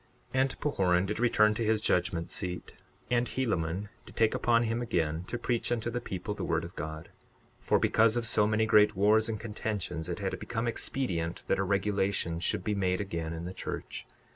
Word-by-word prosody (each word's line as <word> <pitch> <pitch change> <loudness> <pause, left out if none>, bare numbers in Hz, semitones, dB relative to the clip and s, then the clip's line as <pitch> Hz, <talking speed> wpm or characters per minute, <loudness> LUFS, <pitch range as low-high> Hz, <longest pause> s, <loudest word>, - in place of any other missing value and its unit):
62:44 130 - +3
And 135 0 -1
Pahoran 95 -10 +2
did 105 +3 -3
return 105 -3 +4
to 115 - -2
his 110 0 +2
judgment 85 -5 0
seat; 90 -2 -4 0.4
and 120 0 +2
Helaman 100 -6 -1 0.2
did - - -13
take 115 -1 +3
upon 120 -1 +3
him 115 +1 -1
again 85 -7 -1
to 120 - -4
preach 120 0 -1
unto 120 0 -1
the 120 +1 -2
people 100 -1 -4
the - - -5
word 85 -1 0
of 85 +2 -9
God; 80 +1 -6 0.5
for - - +2
because 115 +1 +3
of 120 - -1
so 105 -2 +4
many 110 +1 +2 0.3
wars 110 +3 +4
and 110 -2 -3
contentions 105 -7 -4
it - - -2
had - - -3
become 115 +1 -3
expedient 90 -9 -1
that - - +1
a - - +2
regulation 100 -3 0
should 85 - -1
be 105 - 0
made 95 -2 0
again 85 -5 -3
in 85 +1 -5
the 90 - -5
church. - - -6
105 Hz, 195 wpm, -30 LUFS, 90-115 Hz, 0.5 s, return